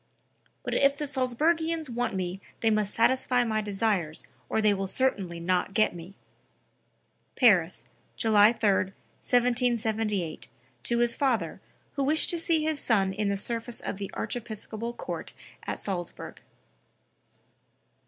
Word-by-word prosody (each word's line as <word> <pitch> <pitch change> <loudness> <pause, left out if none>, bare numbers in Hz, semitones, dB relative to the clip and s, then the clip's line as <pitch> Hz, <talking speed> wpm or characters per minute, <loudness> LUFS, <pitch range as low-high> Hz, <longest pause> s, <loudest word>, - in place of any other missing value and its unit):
but - - -3
if 280 0 +3
the 295 - -2
Salzburgians 310 +5 +1
want 240 -3 -2
me 185 +1 -3 0.2
they 225 - +3
must 210 -1 +1
satisfy 250 +1 +2
my 220 -2 0
desires 195 -6 -1 0.2
or - - +1
they 215 -1 +4
will 195 -1 -2
certainly 190 -8 -1
not 180 +3 0
get 215 - +3
me." 175 +3 -10 1.2
(Paris, 190 -9 +3 0.3
July 215 -1 +5
3, 225 -3 +1
1778, 220 -1 0 0.3
to 235 - 0
his 240 0 +2
father, 230 - 0 0.3
who 280 - -1
wished 305 +3 +3
to 340 - -1
see 330 -3 +2
his 310 -1 0
son 195 -7 +2
in 205 +1 -1
the 200 - 0
service 230 +3 -2
of - - -4
the 195 -1 -5
archiepiscopal 225 0 -4
court 240 - -6 0.3
at - - -3
Salzburg.) 180 -4 -5
220 Hz, 135 wpm, -28 LUFS, 195-250 Hz, 1.2 s, July